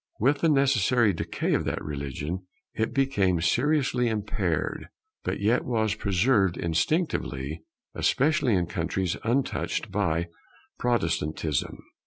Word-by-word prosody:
With 140 +6 +3
the 165 - +3
necessary 125 -6 +3
decay 85 - -2
of - - +1
that - - -1
religion, 75 +5 -4 0.3
it 110 +1 -1
became 130 -11 +2
seriously 125 - +2
impaired, 110 -2 -2 0.4
but - - -2
yet 110 +5 +2
was 110 -3 0
preserved 100 -2 +2
instinctively, 80 - -1 0.3
especially 140 -5 +2
in 90 -2 +1
countries 85 +2 -2
untouched 125 +4 -1
by 85 +1 0 0.5
Protestantism. 80 - -1
100 Hz, 110 wpm, -27 LUFS, 85-125 Hz, 0.5 s, With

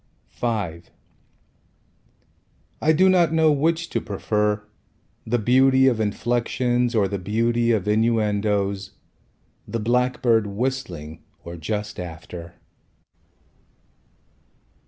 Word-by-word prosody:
V 120 - -3 2.3
I 155 - +4
do 180 +4 +4
not 175 -4 +4
know 160 -1 +4
which 165 +4 +1
to - - -1
prefer, 105 0 -1 0.6
The 120 +2 +1
beauty 130 +3 +4
of 125 -4 +3
inflexions 120 +3 0
Or 105 -3 +3
the 100 0 -4
beauty 115 +5 +1
of 105 -4 0
innuendos, 105 -3 0 0.7
The 115 - -3
blackbird 120 -1 +1
whistling 100 - -4 0.2
Or 85 0 -8
just 105 +6 -4
after. 85 0 -8
110 Hz, 95 wpm, -23 LUFS, 100-125 Hz, 2.3 s, I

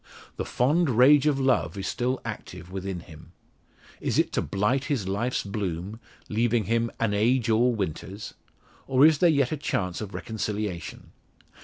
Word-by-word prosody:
The - - -3
"fond 150 +6 +2
rage 135 +5 +6
of 145 -2 +2
love" 105 - +1
is 95 - -3
still 125 +2 -1
active 90 -5 -7
within 95 -2 -4
him. 80 -2 -14 0.7
Is - - -1
it - - +2
to - - 0
"blight 115 +8 0
his 125 -10 -1
life's 110 +6 -1
bloom," 100 0 -4 0.3
leaving 115 +1 +1
him 115 +2 0
"an 115 -3 +1
age 115 +3 +2
all 120 +2 +3
winters?" 95 +1 -5 0.5
Or 130 +2 +5
is 155 -2 +5
there 175 - +5
yet 140 -5 +2
a 155 - -1
chance 95 - -2
of 100 -3 -6
reconciliation? 105 -3 -4
110 Hz, 160 wpm, -26 LUFS, 95-130 Hz, 0.7 s, rage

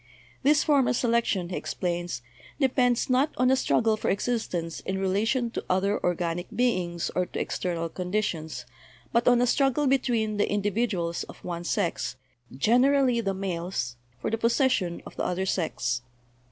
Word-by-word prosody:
"This 290 +1 +4
form 285 -4 +3
of - - +2
selection," 230 -7 +1
he 180 - -3
explains, 175 -8 -3 0.4
"depends, 250 -3 +2
not 260 +3 +3
on 255 +1 +4
a - - +5
struggle 225 -4 +2
for 215 - -2
existence 190 -6 -1
in 190 - -3
relation 220 +6 +1
to - - -4
other 195 +3 +1
organic 175 0 -1
beings, 180 -9 0
or 180 -1 +1
to - - -5
ex - - -3
ternal 170 -2 -2
conditions, 180 - -2 0.5
but 235 0 +2
on 245 -1 +6
a - - +4
struggle 275 +3 +2
between 240 -5 +1
the 205 - +2
individu 205 +2 0
als 170 0 -2
of - - -12
one 175 -1 -4
sex, 170 -5 -1 0.4
generally 250 - +4
the 195 -3 -1
males, 175 -10 -3 0.2
for 125 - -2
the 225 - -1
possession 230 - +1
of - - -11
the - - -1
other 185 +1 -1
sex. 125 -10 -1
205 Hz, 165 wpm, -27 LUFS, 175-245 Hz, 0.5 s, on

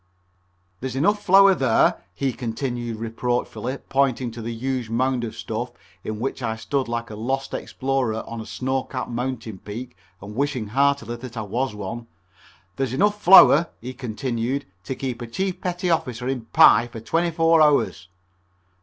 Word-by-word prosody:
"There's 130 0 -4
enough 205 +9 +2
flour 195 +1 +7
there," 130 -9 +2
he 135 -2 -1
continued 120 -1 -4
reproachfully, 120 +3 -2
pointing 130 -3 +1
to 115 +1 -8
the 115 +1 -4
huge 125 0 -3
mound 125 +1 0
of 115 -1 -5
stuff - - -4 0.3
in 110 -1 -4
which 130 +2 -3
I 110 -2 -1
stood 135 +3 -2
like 115 -1 -3
a - - -6
lost 130 +5 -3
explorer 130 -4 -2
on 115 -1 -6
a 110 - -9
snow 130 +3 -1
capped 130 -1 -5
mountain 120 -4 -4
peak 120 +4 -8 0.2
and 105 +2 -9
wishing 130 -5 -1
heartily 135 -2 +1
that 120 0 -9
I 110 - -2
was 120 +4 -2
one, 110 +4 -6 0.7
"there's 135 -2 -1
enough 205 +8 +1
flour," 175 -2 +8
he 125 +2 -7
continued, 125 +1 -3 0.2
"to 130 - -3
keep 125 -2 -4
a 120 - -5
chief 185 +10 -3
petty 180 0 -1
officer 125 -6 -1
in 130 -3 -2
pie 115 +1 +6
for 120 -1 -9
twenty 165 +10 0
four 165 0 +4
hours." 145 - +2
125 Hz, 165 wpm, -23 LUFS, 115-135 Hz, 0.7 s, flour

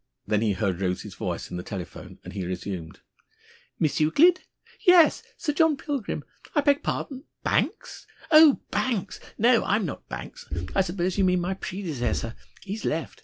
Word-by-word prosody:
Then 105 -1 +1
he 110 -3 +2
heard 95 -2 -1
Rose's 90 -1 -2
voice - - -4
in 90 - -4
the - - -3
telephone, 90 -1 -8
and 90 - -9
he 95 -2 -3
resumed: 90 -2 -5 0.8
"Miss 155 - +1
Euclid? 320 - +5 0.4
Yes. 360 -3 +6 0.2
Sir 300 -3 -1
John 320 -1 +3
Pilgrim. 275 -6 -3 0.3
I 295 - +5
beg 285 0 +3
pardon! 270 +1 -4 0.2
Banks? 385 +10 -1 0.2
Oh, 310 -2 +8
Banks! 230 -8 -1 0.2
No, 235 +1 +4
I'm 205 0 +1
not 150 - -7
Banks. - - -8 0.2
I - - +3
suppose 185 +1 -1
you - - +4
mean 180 -1 +3
my 180 +2 -1
predecessor. 155 - -3 0.3
He's 205 +2 -5
left. 160 +1 -2
185 Hz, 160 wpm, -26 LUFS, -, 0.8 s, Oh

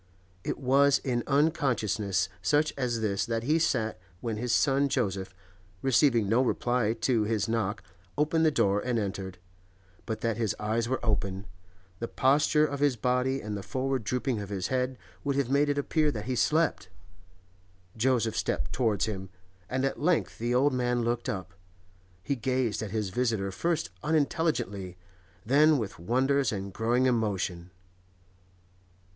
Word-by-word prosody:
It - - -2
was 140 +1 +4
in 125 -3 -1
unconsciousness 130 - +1
such 145 +11 +2
as 120 -4 -1
this 100 -2 0
that 115 -1 -1
he 155 +6 +2
sat 110 - 0 0.2
when 115 -1 -3
his 120 +2 -2
son 140 +2 +3
Joseph, 95 -7 -1 0.5
receiving 125 -4 +3
no 115 +5 +3
reply 120 -3 +1
to 115 -5 +2
his 110 -1 0
knock, 105 -4 -1 0.3
opened 155 +2 +2
the 160 - +5
door 100 -8 +2
and 125 +1 -1
entered; 95 -3 -4 0.7
but 110 -2 -3
that 115 -2 0
his 110 -4 0
eyes 115 +2 -1
were 130 - 0
open, 100 -2 -1 0.5
the 115 - -3
posture 145 +4 +3
of 140 -2 -4
his 145 -3 +3
body 125 +3 0
and 105 0 -4
the 100 - -4
forward 130 +4 -2
drooping 125 +1 -1
of 100 -1 -6
his 95 -3 -3
head 130 0 -1 0.3
would 140 -1 0
have 135 -2 0
made 145 +1 +3
it 145 - 0
appear 150 +2 +1
that 110 -7 -4
he 130 - -1
slept. 155 - +1 1.1
Joseph 115 -1 +1
stepped 65 +1 -2
towards 110 -6 +1
him, 95 -3 -5 0.4
and 130 +1 0
at 135 - -2
length 170 +2 +1
the 120 +2 0
old 135 +2 +3
man 125 -1 0
looked 120 +1 -1
up. 95 -8 -4 0.7
He 140 +8 -1
gazed 125 -3 -1
at 110 - -4
his 105 -1 -2
visitor 110 -4 0
first 165 - -1
unintelligently, 145 - -1 0.5
then 150 +5 +5
with 110 -9 -4
wonder 130 +9 +2
and 100 -2 -5
growing 120 +5 +1
emotion. 100 -7 -1
120 Hz, 155 wpm, -28 LUFS, 105-135 Hz, 1.1 s, the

